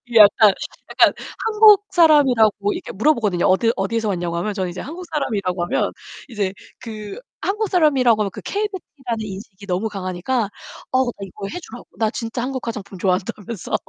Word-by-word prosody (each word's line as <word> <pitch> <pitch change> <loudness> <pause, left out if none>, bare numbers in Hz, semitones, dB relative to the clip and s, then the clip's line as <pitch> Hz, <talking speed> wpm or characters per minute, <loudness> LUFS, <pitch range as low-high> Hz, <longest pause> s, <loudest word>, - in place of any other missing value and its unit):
약간 210 -1 +7 0.4
약간 - - +4 0.3
한국 425 -2 +6
사람이라고 250 - +4
이렇게 - - -6
물어보거든요. 210 - +2
어디 225 +5 +3
어디에서 215 +3 -1
왔냐고 175 -3 -2
하면 205 +5 -2
저는 190 -2 -2
이제 180 - -6
한국 340 +6 -8
사람이라고 200 - -1
하면 - - 0 0.4
이제 205 -5 -2 0.3
그 215 - -8 0.2
한국 420 +1 -1
사람이라고 270 - +3
하면 200 -2 -1
그 - - -9
K-beauty 405 -2 -3 0.2
라는 225 -3 -2
인식이 200 0 -9
너무 185 +4 -1
강하니까 195 +4 -2 0.4
어 260 0 +3
나 240 - -2
이거 195 +1 -7
해 360 - -5
주라고. 245 -6 -11
나 220 -1 +1
진짜 230 0 -4
한국 260 0 -4
화장품 205 -4 -6
좋아한다면서. 195 +2 -2
220 Hz, 420 characters per minute, -21 LUFS, 195-260 Hz, 0.4 s, 약간